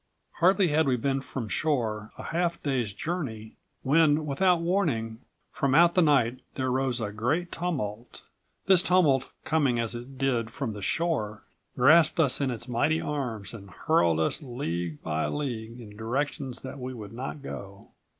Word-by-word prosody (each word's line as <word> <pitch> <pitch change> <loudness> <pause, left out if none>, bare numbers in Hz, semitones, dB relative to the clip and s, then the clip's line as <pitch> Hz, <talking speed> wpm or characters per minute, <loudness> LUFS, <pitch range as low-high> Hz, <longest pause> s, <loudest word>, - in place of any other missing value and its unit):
Hardly 185 +1 +4
had 155 0 +2
we 130 - +3
been 135 +3 -1
from 130 -4 -5
shore 110 -6 -1
a - - -7
half 170 0 -1
day's 125 -7 0
journey, 110 - -5 0.3
when, 150 +1 +3
without 175 +5 +2
warning, 150 - 0 0.3
from 135 -1 0
out 170 +2 +6
the 180 - +4
night 130 -6 +3 0.2
there 130 -1 -1
rose 130 -1 0
a 105 -3 -3
great 140 +12 -1
tumult. 125 -10 -4 0.4
This 190 -2 +6
tumult, 165 -9 +3
coming 145 -6 +1
as 115 0 +1
it 120 +3 -8
did 125 -4 0
from 120 -1 -4
the 105 - -8
shore, 110 - -1 0.3
grasped 155 +6 +5
us 140 -6 +3
in118 135 -2 0
its 120 +1 -4
mighty 145 +7 +1
arms 120 -9 -3
and 100 -3 -10
hurled 85 -2 +2
us 80 - 0
league 85 - -4
by 80 0 -1
league 120 -5 -4
in 105 -3 -11
directions 130 +3 -3
that 135 +1 -8
we 130 0 -5
would 105 -3 -9
not 135 +4 -6
go. 100 -6 -9
130 Hz, 165 wpm, -27 LUFS, 110-155 Hz, 0.4 s, out